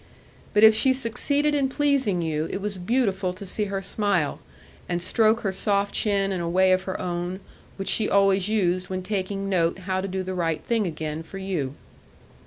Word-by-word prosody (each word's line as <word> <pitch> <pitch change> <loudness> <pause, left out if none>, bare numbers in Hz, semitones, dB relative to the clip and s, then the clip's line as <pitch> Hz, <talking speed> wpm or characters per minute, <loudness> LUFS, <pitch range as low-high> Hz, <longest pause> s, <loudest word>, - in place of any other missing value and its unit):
But 210 - +5
if 220 0 +9
she 260 +5 +4
succeeded 280 +4 0
in 275 -2 +1
pleasing 270 - +1
you, 155 -1 -1
it - - -3
was 200 -1 -4
beautiful 195 -3 0
to 200 +2 -9
see 210 +3 -2
her 195 -1 -3
smile, 195 -6 0 0.5
and 175 -1 0
stroke 220 +5 +2
her 195 - -1
soft 200 +1 0
chin 200 -2 +1
in 185 -2 -2
a 170 - -2
way 185 +2 +4
of 185 0 +2
her 190 - -4
own, 175 +1 -3 0.4
which 195 - -5
she 215 - +1
always 195 0 +3
used 185 -4 0
when 185 -1 -3
taking 195 0 -3
note 170 -3 +1
how 185 0 -1
to 195 - -3
do 190 0 -3
the 185 0 -4
right 165 -3 -1
thing 225 -4 0
again 155 -1 -4
for 180 +4 -10
you. 175 -9 -3
195 Hz, 195 wpm, -25 LUFS, 180-210 Hz, 0.5 s, if